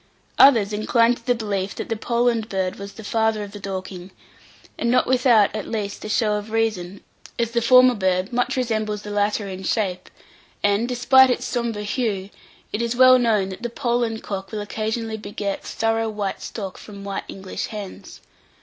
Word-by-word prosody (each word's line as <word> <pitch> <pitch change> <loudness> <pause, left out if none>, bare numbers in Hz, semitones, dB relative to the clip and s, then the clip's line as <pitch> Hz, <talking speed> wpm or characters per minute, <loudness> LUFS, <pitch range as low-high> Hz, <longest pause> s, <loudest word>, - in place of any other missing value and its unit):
Others 225 -7 +6
inclined 230 +3 +2
to - - -20
the 245 - +3
belief 200 -4 -3
that - - -5
the 225 - -1
Poland 235 0 0
bird 190 -1 -2
was 200 0 -8
the 220 - -11
father 220 0 0
of 200 - -8
the 205 - -9
Dorking, 185 -2 -6 0.7
and 235 - -1
not 250 - +3
without 245 -5 +4
at 215 - -4
least 205 -3 -4
a 215 - -5
show 210 -1 +1
of 210 +1 -7
reason, 215 -4 -2 0.3
as 235 -1 0
the 235 0 +1
former 255 +2 +6
bird 190 -1 0
much 245 +2 0
resembles 215 -4 -1
the 210 - -7
latter 205 0 0
in 190 -1 -6
shape; 185 -2 -2 0.5
and, 205 +3 +2
despite 255 +2 +5
its 250 - -1
sombre 235 -3 -2
hue, 205 -3 -2 0.4
it 210 - -1
is 235 0 -1
well 255 0 +7
known 215 -5 +2
that 190 +3 -8
the 240 - -3
Poland 235 -2 -1
cock 195 -2 -5
will 215 - -3
occasionally 220 +1 -3
beget 200 -1 -4
thorough 225 0 -1
white 205 -2 -4
stock 195 -4 -6
from 200 -2 -11
white 200 -1 -4
English 190 -1 -5
hens. 210 -4 -9
215 Hz, 185 wpm, -22 LUFS, 200-235 Hz, 0.7 s, well